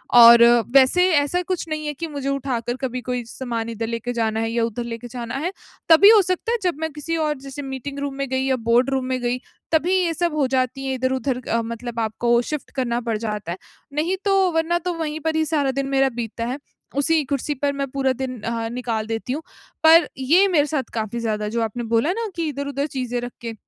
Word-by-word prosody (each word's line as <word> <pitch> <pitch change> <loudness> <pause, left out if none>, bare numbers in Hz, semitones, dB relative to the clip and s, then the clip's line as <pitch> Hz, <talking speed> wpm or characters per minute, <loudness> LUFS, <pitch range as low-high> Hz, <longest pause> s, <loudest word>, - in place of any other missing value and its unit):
और 235 0 +10 0.3
वैसे 275 +6 +6
ऐसा 290 +5 +2
कुछ 370 -3 -2
नहीं 310 -1 -3
है, 295 - -2
कि 330 +4 -5
मुझे 285 -3 -4
उठाकर 250 -4 -2
कभी 255 -1 -3
कोई 250 0 -3
सामान 230 -1 -4
इधर 225 0 -4
लेके 230 +1 -3
जाना 220 -2 0
है, 225 0 -1
या 230 0 +1
उधर 230 +1 -4
लेके 235 0 -6
जाना 235 -1 -6
है। 320 +7 -2 0.4
तभी 335 +5 +9
हो 435 -2 +8
सकता 370 +4 -1
है, 475 - +2
जब 360 -4 +1
मैं 320 0 -2
किसी 315 +3 -3
और 305 -2 0
जैसे 275 +1 -7
मीटिंग 270 +1 -6
रूम 280 -1 -3
में 275 0 -3
गई 260 0 0
या 265 -1 +2
बोर्ड 245 +3 +4
रूम 265 -1 -1
में 255 0 -1
गई 245 +1 -1 0.3
तभी 330 +3 +2
ये 355 -3 +1
सब 340 0 -1
हो 300 -2 +1
जाती 260 +1 -1
है, 265 - -1
इधर-उधर 260 0 -1
अ, 230 +1 +1
मतलब 235 +1 -5
आपको 235 +2 +1
शिफ्ट 300 +4 -5
करना 240 -3 0
पड़ 230 -2 -1
जाता 210 -5 -4
है। 175 - -4 0.4
नहीं 320 +6 0
तो, 390 -2 +3
वरना 325 +1 +1
तो, 355 +1 -3
वहीं 315 -2 -3
पर 315 +1 -1
ही 315 - +2
सारा 295 -4 +1
दिन 275 +1 -2
मेरा 270 0 +2
बीतता 230 -1 -4
है। 250 +3 -3 0.4
उसी 310 +2 +2
कुर्सी 280 +2 -2
पर 280 +1 -1
मैं 275 0 -2
पूरा 270 -1 +1
दिन 255 -2 -4
अ, 230 +1 -2
निकाल 230 -3 -3
देती 225 +3 -3
हूँ। 300 - -3 0.4
पर 325 +2 +7
ये 325 +10 +4
मेरे 320 -6 +3
साथ 285 -2 -1
काफ़ी 220 +1 -3
ज़्यादा, 215 -2 -2
जो 230 +2 -1
आपने 225 +2 -3
बोला 230 +9 +3
ना 455 +2 -3
कि 335 -2 -1
इधर-उधर 280 0 -3
चीज़ें 250 -4 -3
रख 245 0 -5
के, 230 -1 -5
265 Hz, 230 wpm, -22 LUFS, 235-305 Hz, 0.4 s, और